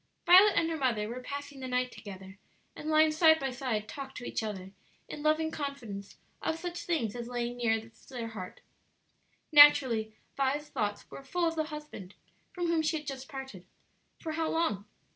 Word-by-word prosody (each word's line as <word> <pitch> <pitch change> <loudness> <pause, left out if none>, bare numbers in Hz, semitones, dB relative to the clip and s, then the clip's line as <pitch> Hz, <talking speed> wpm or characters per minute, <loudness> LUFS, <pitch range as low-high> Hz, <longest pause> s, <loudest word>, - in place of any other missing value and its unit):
Violet 380 +4 +8
and 330 - +3
her 325 - -2
mother 235 -7 0
were 245 +3 -6
passing 285 +1 -7
the 260 - -5
night 250 0 0
together, 190 -1 -10 0.4
and 310 - -6
lying 310 0 +5
side 315 0 +5
by 270 -1 -2
side 245 -5 -2
talked 270 -1 -8
to 245 - -7
each - - -2
other 195 -3 -5 0.4
in 295 - -7
loving 310 +1 +2
confidence 240 -10 -6 0.2
of 320 - -1
such 350 +1 -6
things 245 -12 0
as 240 -1 -5
lay 240 -1 -2
nearest 225 -2 -2
their 240 -4 -5
hearts. 185 -5 -8 0.9
Naturally 260 -7 +7 0.2
Vi's 280 +2 0
thoughts 205 -1 -2
were 275 - -9
full 340 +5 0
of 330 - -2
the 315 -1 0
husband 300 - -9 0.4
from 350 -1 -3
whom 335 -1 +2
she 315 +1 0
had 300 - -8
just 270 -2 -6
parted 265 -10 -8 0.5
for 320 - -5
how 320 0 -1
long? 270 - 0
270 Hz, 180 wpm, -30 LUFS, 225-310 Hz, 0.9 s, Violet